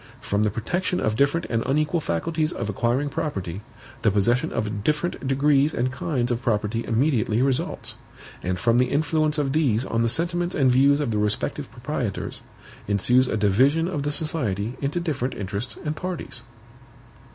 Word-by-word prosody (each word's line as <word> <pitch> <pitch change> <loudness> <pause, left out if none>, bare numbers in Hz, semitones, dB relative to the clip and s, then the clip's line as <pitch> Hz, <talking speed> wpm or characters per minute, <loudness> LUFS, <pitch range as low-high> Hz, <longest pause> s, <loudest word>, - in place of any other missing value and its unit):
From 100 +1 -1
the 105 - +3
protection 175 - -1
of 110 0 0
different 140 +7 +2
and 115 -1 0
unequal 150 +4 +1
faculties 155 - -1
of 105 - -3
acquiring 120 +7 0
property, 95 - -3 0.4
the - - +4
possession 105 +5 +2
of 105 -1 -2
different 150 0 -1
degrees 140 +2 +3
and 125 +2 0
kinds 130 -2 -1
of 120 0 -1
property 110 0 0
immediately 115 -3 +1
results; 135 -2 -1 0.4
and 90 +1 -1
from 115 +6 +3
the 125 - +3
influence 155 +1 +1
of 140 -2 0
these 130 -7 +2
on 115 -2 0
the 115 - +2
sentiments 175 +5 -1
and 135 -3 +4
views 140 +3 +5
of 140 -6 -1
the 105 - 0
respective 105 0 -2
proprietors, - - -4 0.5
ensues 125 +6 +3
a 110 - -1
division 130 - +3
of 175 -6 -2
the 145 - -1
society 125 - -1
into 145 +5 -1
different 140 -7 -2
interests 105 +4 -3
and 150 +1 -1
parties. 180 0 -4
130 Hz, 165 wpm, -24 LUFS, 110-150 Hz, 0.5 s, views